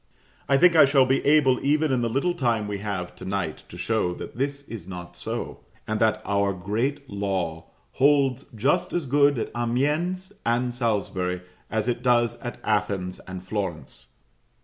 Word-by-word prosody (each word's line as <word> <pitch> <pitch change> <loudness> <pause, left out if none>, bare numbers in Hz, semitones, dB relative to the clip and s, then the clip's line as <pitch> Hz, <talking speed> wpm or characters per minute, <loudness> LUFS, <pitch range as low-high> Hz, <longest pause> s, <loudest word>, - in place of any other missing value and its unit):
I 140 - +5
think 175 +2 +6
I 160 - +9
shall 135 -1 +4
be 135 +1 +1
able, 140 -4 +4
even 150 +1 +2
in 125 -2 +2
the 120 - 0
little 140 +9 +1
time 120 -9 0
we 100 -1 -3
have 95 -4 -4
to - - -10
night, 95 -5 -3
to - - -10
show 110 -6 0
that - - -8
this 140 +3 -2
is 110 -10 -9
not 90 -2 -8
so; - - -5 0.3
and 110 0 -1
that 110 -1 +2
our 100 -1 +1
great 115 +10 -2
law 95 -6 -3 0.2
holds 140 -1 +3
just 160 - +1
as 175 -4 0
good 140 +1 +4
at 115 - -3
Amiens 150 +11 0
and 120 +1 +1
Salisbury, 100 -6 -1 0.3
as 110 0 -1
it 120 -1 -1
does 120 -2 +2
at 120 - -6
Athens 100 -4 -1
and 95 -1 -7
Florence. 90 - -5
120 Hz, 170 wpm, -25 LUFS, 100-140 Hz, 0.3 s, I